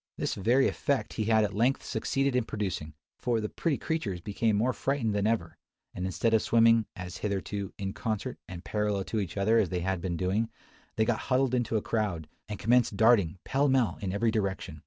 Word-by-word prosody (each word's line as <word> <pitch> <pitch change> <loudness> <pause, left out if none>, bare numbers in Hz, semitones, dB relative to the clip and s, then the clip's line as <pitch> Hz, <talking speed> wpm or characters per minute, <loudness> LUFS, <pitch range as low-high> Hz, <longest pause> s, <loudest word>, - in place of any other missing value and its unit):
This - - -1
very 120 +7 +3
effect 140 -2 -1
he 110 -1 -2
at 110 -2 +3
length 120 +6 +1
succeeded 135 +4 0
in 125 - +3
producing; 95 -9 -4 0.2
for 120 -2 0
the 105 -1 -3
pretty 160 -5 -1
creatures 120 - -2
became 105 +4 0
more 120 +5 +1
frightened 120 -1 -1
than 100 0 +1
ever; 110 -7 -1 0.3
and 90 +1 -3
instead 110 +5 0
of 110 - +4
swimming, 115 -1 +4
as 90 -1 -7
hitherto, 100 -1 -3
in 95 0 -4
concert, 115 +1 -3
and 90 -1 -9
parallel 105 -2 0
to 110 - -2
each 100 -1 -4
other 110 +4 +3
as 100 -6 +1
they 90 0 -2
had 95 0 -1
been 85 -2 -2
doing, 100 +6 0 0.5
they 110 - +2
got 110 -2 0
huddled 130 -1 +2
into 120 -2 +1
a 105 - -2
crowd, 100 -9 -1 0.2
and 105 - -4
commenced 115 -1 +2
darting, 110 -6 +4
pell 140 +2 +2
mell, 130 -4 +2
in 95 -2 -2
every 110 +3 +1
direction. 95 -6 -2
110 Hz, 200 wpm, -29 LUFS, 95-115 Hz, 0.5 s, of